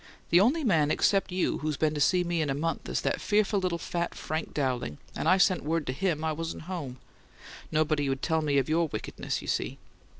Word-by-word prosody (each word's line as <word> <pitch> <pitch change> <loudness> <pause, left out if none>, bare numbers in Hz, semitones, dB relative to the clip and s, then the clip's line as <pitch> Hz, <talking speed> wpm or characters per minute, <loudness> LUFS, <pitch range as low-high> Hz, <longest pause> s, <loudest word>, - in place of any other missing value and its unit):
The 175 - +7
only 270 - +3
man 160 - +3
except 195 +4 +2
you 180 0 0
who's 150 -1 -2
been 155 -1 +1
to 150 - -2
see 180 +5 +4
me 170 -1 0
in 150 - -1
a 135 - 0
month 165 +3 -2
is - - -1
that - - -1
fearful 210 -1 +2
little 180 -2 -1
fat 170 0 -3
Frank 155 +1 -4
Dowling, 125 - -2 0.2
and - - -2
I 185 - +6
sent 185 -1 +3
word 160 +1 -1
to 130 - -2
HIM 165 0 -1
I 160 - +1
wasn't 165 +1 -5
home. 160 -8 -5 0.7
Nobody'd 145 -3 +1
tell 160 0 +1
me 145 -2 +1
of 135 - +2
your 165 +1 +2
wickedness, 110 -7 -4
you - - -9
see." - - -1
160 Hz, 220 wpm, -28 LUFS, 145-180 Hz, 0.7 s, The